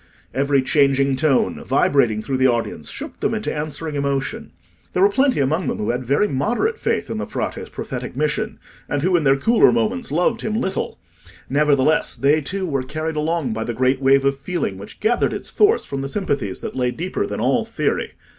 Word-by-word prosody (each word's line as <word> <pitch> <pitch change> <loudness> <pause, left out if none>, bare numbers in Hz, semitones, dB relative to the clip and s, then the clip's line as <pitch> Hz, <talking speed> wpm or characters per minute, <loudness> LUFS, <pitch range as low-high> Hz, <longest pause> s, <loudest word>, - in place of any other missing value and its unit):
Every 140 +1 +2
changing 140 -1 +3
tone, 145 -3 +1
vibrating 120 -5 +2
through 135 +1 -1
the 130 0 +4
audience, 115 -10 -2
shook - - -7
them - - 0
into - - -2
answering 155 +1 -4
emotion. 140 -1 -2 0.4
There 180 - +3
were 200 - +6
plenty 265 - +2
among 150 +4 +1
them - - -1
who 105 - -1
had 125 +1 -3
very 140 - +2
moderate 240 - 0
faith - - -1
in - - -3
the - - -4
Frate's - - -4
prophetic - - -6
mission, - - -1 0.3
and 145 -1 -1
who 185 +1 +3
in 165 -4 +2
their 135 0 +5
cooler 225 +11 +4
moments 235 +1 -1
loved 180 +9 +1
him 215 +1 -1
little; 190 -5 -2 0.5
nevertheless, 145 +1 +2
they 145 +3 +3
too 190 +6 -3
were 140 -6 -1
carried 155 +4 -4
along 155 -4 -1
by 110 0 -2
the 120 0 -4
great 130 +2 +1
wave 135 0 +4
of 140 0 +2
feeling 135 - -3
which 100 - -11
gathered 235 +2 +2
its - - -5
force 430 +2 +3
from 135 0 -4
sympathies 140 - -2
that - - -6
lay 125 -1 +1
deeper 180 - -3
than - - -4
all - - +2
theory. - - -2
140 Hz, 195 wpm, -21 LUFS, 135-180 Hz, 0.5 s, were